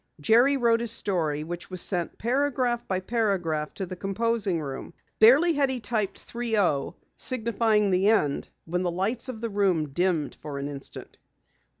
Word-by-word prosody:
Jerry 240 - +4
wrote 235 -2 +3
his 235 0 -1
story 165 -9 0
which 175 +2 -7
was 185 -1 -5
sent 175 -2 0
paragraph 250 -1 0
by 185 -1 -1
paragraph 185 -8 -1
to 195 - -3
the 185 - -7
composing 200 -1 -1
room. 135 -3 -7 0.2
Barely 275 +10 +6
had 280 -2 +2
he 260 -1 -1
typed 215 -2 -2
"30," 210 -11 -1 0.2
signifying 225 -4 +1
the 185 +2 +2
end, 150 -11 +1 0.2
when 180 +2 -2
the 180 - 0
lights 210 +9 -1
of 225 -4 -6
the 230 - -2
room 185 -7 +1
dimmed 165 -1 -1
for 145 -2 -6
an 140 0 -3
instant. 140 -1 -9
200 Hz, 165 wpm, -26 LUFS, 175-235 Hz, 0.2 s, Barely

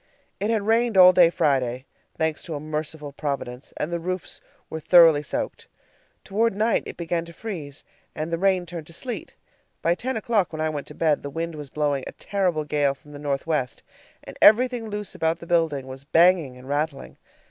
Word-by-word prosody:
It 205 +3 -1
had 220 -3 +1
rained 225 0 +2
all 185 0 +9
day 175 -2 +6
Friday, 130 -5 0 0.3
thanks 160 -1 0
to 165 - -5
a - - -4
merciful 155 -1 -5
Providence, 140 -3 -5
and 165 +3 -3
the 170 - -1
roofs 185 +2 -5 0.3
were 160 - -5
thoroughly 165 -2 +6
soaked. 150 - -4 0.6
Toward 220 +2 0
night 220 +3 +2
it - - -8
began 170 0 -2
to 170 - -12
freeze, 160 -10 -7 0.3
and 160 +2 -4
the 165 - 0
rain 190 -1 +2
turned 165 -3 -8
to 165 - -11
sleet. 245 +8 -5 0.5
By 170 - +3
ten 245 +6 -3
o'clock, 215 -4 +1
when 155 - -5
I 155 0 0
went 145 -2 -5
to - - -11
bed 155 -3 +1
the 140 - -6
wind 165 +3 -4
was 150 -3 -8
blowing 145 -2 -1
a - - -7
terrible 185 -6 -1
gale 145 -2 +1
from 145 +2 -18
the 145 - -9
northwest, 140 -2 -2 0.4
and - - -11
everything 240 +1 +5
loose 210 -1 -5
about 160 +1 0
the 170 - -11
building 165 -5 +1
was 130 +1 -9
banging 165 -3 +3
and 125 +1 -13
rattling. 145 0 -3
160 Hz, 195 wpm, -24 LUFS, 145-185 Hz, 0.6 s, all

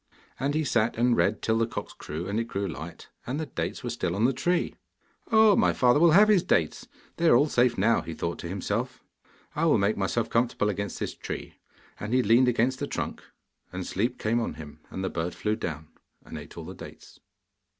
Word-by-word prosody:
And 140 +3 0
he 155 - +1
sat 115 -6 +1
and 120 +1 +3
read 105 -1 +1
till 110 0 +1
the 115 - +2
cocks - - -6
crew 80 +4 -6
and 100 +3 -1
it 115 - -1
grew 100 -3 -3
light, 80 +1 -8 0.2
and 135 +5 -2
the 160 - -2
dates 135 - -4
were - - -3
still 85 - -2
on 105 +4 +2
the 135 - +3
tree. 175 +6 0 0.6
'Oh 220 -2 +6
my - - +3
father 125 +2 +4
will 170 +1 +6
have 205 +5 +7
his 210 -4 +5
dates; 80 - 0 0.3
they 170 - +2
are 120 - +7
all 145 +5 +4
safe 125 -3 +2
now,' 115 +4 +3
he 80 - -7
thought 85 +2 -3
to - - -6
himself. 105 +7 -3 0.5
'I 155 - +1
will 160 - +4
make 100 +1 +1
myself 105 +4 0
comfortable 115 -3 +1
against 100 -1 -3
this - - -3
tree,' - - -7 0.5
and 110 +4 -2
he 130 - +3
leaned 115 +5 +5
against 125 +2 +1
the - - -2
trunk, - - -4 0.5
and 90 0 -5
sleep 120 +6 -1
came 115 +2 0
on 115 - -3
him, 75 -2 -10
and 95 - -5
the 95 - -1
bird 85 +1 -3
flew 105 0 -1
down 80 -8 -5 0.4
and - - -9
ate - - -9
all - - -7
the - - -7
dates. - - -12
115 Hz, 225 wpm, -27 LUFS, 95-125 Hz, 0.6 s, have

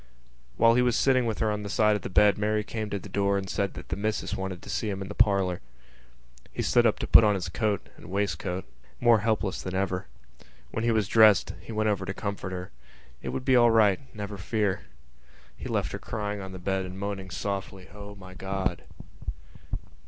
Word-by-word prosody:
While 115 0 +6
he 125 - +4
was 125 -1 +2
sitting 130 -3 +3
with 110 - -1
her 110 -2 +1
on 105 0 -2
the 100 - -5
side 105 0 +3
of 105 - -3
the - - -5
bed 105 +2 +5
Mary 105 0 0
came 110 0 -4
to 100 - -2
the 100 - -9
door 100 0 +1
and 95 -1 -3
said 100 +1 -2
that - - -9
the 90 - -1
missus 105 +2 -2
wanted 95 -2 -5
to - - -10
see 110 - -1
him 95 -1 -3
in 95 -1 -6
the - - -5
parlour. 100 -5 +2 0.9
He - - -3
stood 120 -1 +4
up 110 - +1
to - - -3
put - - +8
on 105 -1 +4
his 90 -2 -3
coat 105 +2 -1
and - - -12
waistcoat, 95 -2 -2 0.3
more 120 -2 +5
helpless 105 -3 0
than 95 0 -5
ever. 95 0 -1 0.6
When 110 - -2
he 120 - +2
was 110 -4 +2
dressed 110 -2 +5
he - - -9
went 110 0 0
over 100 -3 +1
to 95 - -6
her - - -28
to - - -10
comfort 100 -2 -4
her. 90 0 -6 0.5
It - - -4
would 130 - -4
be 130 - +4
all 120 -1 +6
right, 110 -4 +4 0.2
never 100 -1 -6
fear. 105 0 -1 0.7
He - - -7
left - - -1
her - - -5
crying 105 -2 -4
on 95 0 -7
the 95 - -7
bed 95 +1 -1
and 95 0 -7
moaning 100 -1 -4
softly: 95 -1 -4
_"O 105 0 -9
my 95 -1 -12
God!" 95 -1 -2
100 Hz, 225 wpm, -27 LUFS, 95-110 Hz, 0.9 s, put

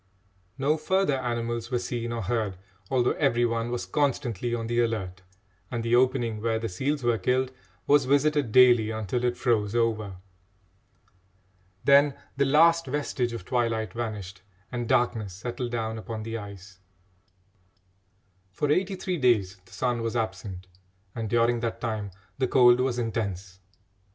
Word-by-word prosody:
No 145 +3 +1
further 155 -3 +1
animals 120 -1 -3
were 125 - 0
seen 120 -1 -3
or 115 -1 -3
heard, 105 -2 -1 0.3
although 125 -2 +2
every 120 -5 +2
one 115 0 -1
was 120 0 -3
constantly 120 -6 -1
on 115 -1 -3
the 120 +1 0
alert, 100 -6 -1 0.5
and 120 -2 -3
the 115 +1 +2
opening 120 -4 +1
where 115 0 0
the 115 0 -3
seals 135 +9 -2
were 120 -2 +2
killed 130 +1 +1 0.3
was 145 -1 +4
visited 145 -2 +2
daily 120 -3 +6
until 110 +2 -2
it 120 0 0
froze 110 -4 +1
over. 110 -4 0 1.7
Then 140 0 +5 0.2
the 140 +1 +2
last 165 +3 +4
vestige 130 -3 -1
of 115 -6 -7
twilight 115 -3 -1
vanished 105 -6 -5 0.3
and 120 -2 -3
darkness 120 -6 +1
settled 120 +5 -5
down 110 -1 -3
upon 110 -1 -6
the 115 +1 -5
ice. 100 -3 -9 1.7
For 145 +10 -1
eighty 190 +5 +1
three 185 -1 -3
days 105 -8 +2
the - - -21
sun 120 -2 -1
was 115 +1 -2
absent, 95 -4 -4 0.5
and 115 -2 -4
during 120 +1 +2
that 115 -1 -3
time 110 -4 -3 0.3
the 130 - +2
cold 125 -1 +6
was 130 -1 0
intense. 100 -6 -3
120 Hz, 150 wpm, -27 LUFS, 110-130 Hz, 1.7 s, daily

